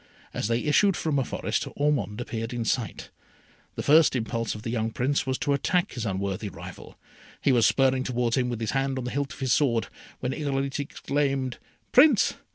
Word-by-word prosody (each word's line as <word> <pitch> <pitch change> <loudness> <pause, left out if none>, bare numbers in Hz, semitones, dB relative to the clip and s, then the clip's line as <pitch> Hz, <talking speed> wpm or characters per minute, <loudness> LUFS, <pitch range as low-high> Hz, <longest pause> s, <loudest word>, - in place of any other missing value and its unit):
As - - -2
they 115 +1 +1
issued 165 +6 +3
from 150 -3 0
a - - +1
forest, - - -2
Ormond 145 -7 0
appeared 115 0 -4
in 120 -1 -3
sight. 120 -1 -2 0.6
The - - -4
first 155 -1 +5
impulse 115 -1 -2
of 105 - -9
the 115 - -3
young 115 -2 -1
Prince 135 +4 -1
was 130 -1 0
to 145 - 0
attack 175 +5 +1
his 120 -3 -4
unworthy 100 +1 -2
rival. - - -11 0.4
He 140 - +2
was 120 -4 +5
spurring 135 -1 +3
towards 120 -2 0
him 125 -2 +1
with 120 -2 -4
his 110 - -1
hand 135 0 0
on 130 - -3
the 125 - -4
hilt 140 +2 -2
of - - -11
his 130 -3 +2
sword, 120 -7 +1 0.3
when 125 - -2
Irolite 140 -2 -2
exclaimed, 140 -2 -2 0.3
"Prince! 265 -4 +6
130 Hz, 195 wpm, -26 LUFS, 115-140 Hz, 0.6 s, Prince